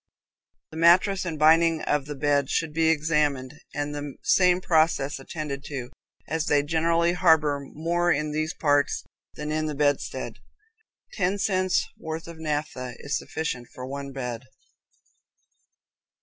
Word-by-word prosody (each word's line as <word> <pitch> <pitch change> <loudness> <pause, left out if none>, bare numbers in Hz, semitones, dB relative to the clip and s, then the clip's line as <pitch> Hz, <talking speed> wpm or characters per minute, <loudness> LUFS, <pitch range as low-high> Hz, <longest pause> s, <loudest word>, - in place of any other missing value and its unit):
The 160 - -8
mattress 185 +3 +4
and 165 -3 -3
binding 160 +1 +4
of 150 -1 0
the 145 - -5
bed 140 -1 +1
should 165 -2 -1
be 165 +1 +2
examined, 150 -4 +1 0.2
and 145 0 -2
the 145 -1 -6
same 180 0 +4
process 155 -5 +2
attended 140 0 -5
to, 130 -4 -6 0.4
as 160 +1 -1
they 145 -1 +3
generally 165 +2 +2
harbor 160 -5 +3
more 170 +5 0
in 150 0 0
these 155 +3 -2
parts 145 -3 +1 0.3
than 150 0 -4
in 155 0 -1
the 150 - -3
bedstead. 145 -1 -1 0.7
Ten 195 - 0
cents' 185 -2 +1
worth 160 +1 -5
of 170 -1 -10
naphtha 150 -5 -3
is 140 +1 -3
sufficient 130 -7 -4
for 125 - -6
one 140 +1 -6
bed. 125 -2 -5
155 Hz, 140 wpm, -26 LUFS, 145-165 Hz, 0.7 s, mattress